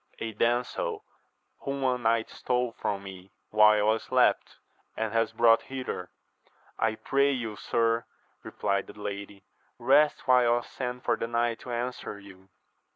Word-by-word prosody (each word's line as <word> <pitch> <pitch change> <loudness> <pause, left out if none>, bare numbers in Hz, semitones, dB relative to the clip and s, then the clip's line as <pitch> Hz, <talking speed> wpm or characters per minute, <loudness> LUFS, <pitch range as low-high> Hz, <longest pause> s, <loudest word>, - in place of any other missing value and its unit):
— - - -24
^A 110 -1 -5
damsel, 415 - -1 0.5
whom 140 -1 -4
a 130 -1 +2
knight 115 -2 +1
stole 125 -1 -1
from 100 -3 -3
me 95 -1 -10 0.2
while 105 0 +5
I 110 - +2
slept, - - +1 0.4
and 110 -2 -2
has 115 0 +1
brought 115 -1 +5
hither. 130 -9 -5 0.7
I 110 -1 +1
pray 140 +4 +2
you, 115 -5 -3
sir, 115 +1 0 0.4
replied 100 -1 -2
the - - -12
lady, 100 -1 -6 0.3
rest 150 0 +3
while 125 -2 +5
I 120 - 0
send 125 0 -6
for - - +2
the 115 - -3
knight 120 0 0
to 125 - -8
answer 120 -3 -4
you. 95 -1 -15
115 Hz, 155 wpm, -28 LUFS, 105-125 Hz, 0.7 s, while